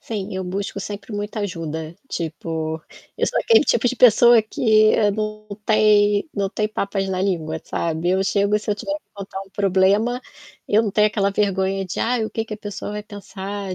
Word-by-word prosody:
Sim, 205 -4 -5
eu 190 0 -3
busco 195 +2 -4
sempre 205 +2 -7
muita 205 +1 -4
ajuda, 165 -4 -4
tipo, 160 0 -4 0.4
eu - - +1
sou - - 0
aquele 455 -9 +5
tipo 235 -3 +2
de 255 - -3
pessoa 240 0 +7
que 215 0 +3
eu 210 -2 +3
não 215 0 -4 0.2
tem 210 +1 +4
não 200 -1 -1
tenho 215 +1 -1
papas 195 -1 -2
na 185 -1 -1
língua, 160 -5 -1
sabe. 165 +1 -1
Eu 190 +1 +2
chego 200 +1 +1
e - - +4
se 210 - -4
eu - - +2
tiver 295 - -3
que 305 - -16
contar 195 -1 -7
um 195 - -16
problema, 200 +5 +2 0.5
eu 215 +2 +4
não 210 - -1
tenho 210 +2 +4
aquela 200 -2 0
vergonha 195 -1 0
de 185 - -6
"Ai 235 -1 +1
o 220 - -5
que 225 - -2
que 220 - -6
a - - -9
pessoa 205 -1 -6
vai 210 0 -4
pensar 200 -2 -6
205 Hz, 205 wpm, -21 LUFS, 190-215 Hz, 0.5 s, pessoa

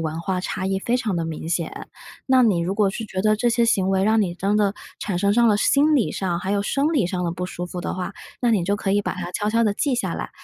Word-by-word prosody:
文 160 0 -3
化 185 +1 -2
差 190 +1 -3
异 190 0 -1
非 240 +5 +1
常 220 -6 -2
地 170 -1 -1
明 160 0 -5
显。 170 -1 -1 0.5
那 260 -1 +5
你 210 -7 +3
如 175 +3 -1
果 205 -2 +2
是 225 +4 -5
觉 190 -2 -4
得 215 0 +3
这 240 +2 +1
些 235 0 +2
行 195 -5 +2
为 190 0 +2
让 220 +2 +3
你 175 -4 -1
真 200 +3 0
的 205 -1 +2 0.2
产 190 -4 -2
生 200 0 +3
上 235 +1 +4
了 210 - +4
心 290 +8 +3
理 255 - +2
上 175 -3 -2
还 190 +1 -3
有 200 0 +1
生 280 +9 0
理 260 - +2
上 180 0 -3
的 170 - 0
不 180 +1 -4
舒 175 -1 -5
服 180 0 -6
的 - - -3
话， 185 +2 -4 0.3
那 240 - +2
你 205 -6 +2
就 200 +3 +1
可 205 -2 -2
以 205 +1 +3
把 - - -3
它 175 -1 -5
悄 205 +3 -2
悄 230 +1 +2
地 210 -2 +2
记 270 +4 0
下 - - -2
来， - - -5
200 Hz, 315 characters per minute, -23 LUFS, 180-225 Hz, 0.5 s, 那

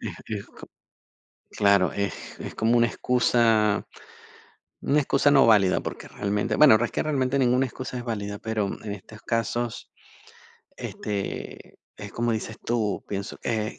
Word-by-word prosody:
Es, - - -5
es 105 -2 -4
co - - -14 0.9
claro, 100 -2 +3
es 100 -1 -5
es - - -7
como 115 +2 +2
una 120 0 +4
excusa 115 -5 +2 1.0
una 145 - +2
excusa 140 0 +3
no 135 -3 +6
válida, 105 -5 +4
porque - - -7
realmente, 105 +1 -1
bueno, 140 -7 +8
es - - -2
que - - 0
realmente 140 -3 0
ninguna 130 0 +3
excusa 130 0 -7
es 120 - -6
válida, 105 -3 -4
pero 110 -2 -1 0.2
en 105 -2 -5
estos 105 +2 -11
casos, 115 0 -2 0.9
este, 100 -2 -5 0.2
es 105 -1 -9
como 120 0 0
dices 110 0 -4
tú, 110 -4 -1
pienso, 100 0 -5
eh, 110 0 -2
110 Hz, 150 wpm, -25 LUFS, 105-120 Hz, 1.0 s, bueno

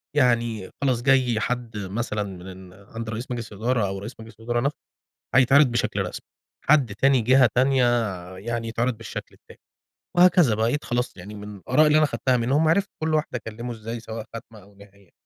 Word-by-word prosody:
يعني، 120 -7 +1
خلاص 130 -4 +1
جاي 130 -3 +3
حد 120 -1 -3
مثلًا 105 +2 -3
من 95 -1 -10
عند 110 +4 -8
رئيس 115 +3 -5
مجلس 115 -3 -5
الإدارة 115 0 0
أو 95 - -4
رئيس 110 +5 -8
مجلس 110 +1 -12
الإدارة 120 +1 -1
نفسه 140 +2 -1 0.6
هيتعرض 135 +3 +6
بشكل 120 -1 -1
رسمي، - - -5 0.4
حد 135 -8 +4
تاني 135 +4 +3
جهة 130 +2 +5
تانية 130 0 +4 0.5
يعني 115 +3 -3
يتعرض 120 +1 -1
بالشكل 115 -3 -8
التاني، - - -18 0.6
وهكذا 175 - +5
بقيت 115 +7 0
خلاص 120 -2 -2
يعني 100 +4 -10
من 105 0 -8
الآراء 150 - +3
اللي 150 0 +5
أنا 155 - +4
خدتها 130 -2 0
منهم 140 +7 +2
عرفت 195 +4 +2
كل 160 0 +1
واحد 155 -3 -1
أكلمه 120 0 -5
إزاي 115 +1 -6
سواء 110 -1 -7
خاتمة 115 -2 -10
أو 100 +1 -20
نهاية. 100 -2 -19
115 Hz, 175 wpm, -24 LUFS, 105-130 Hz, 0.6 s, هيتعرض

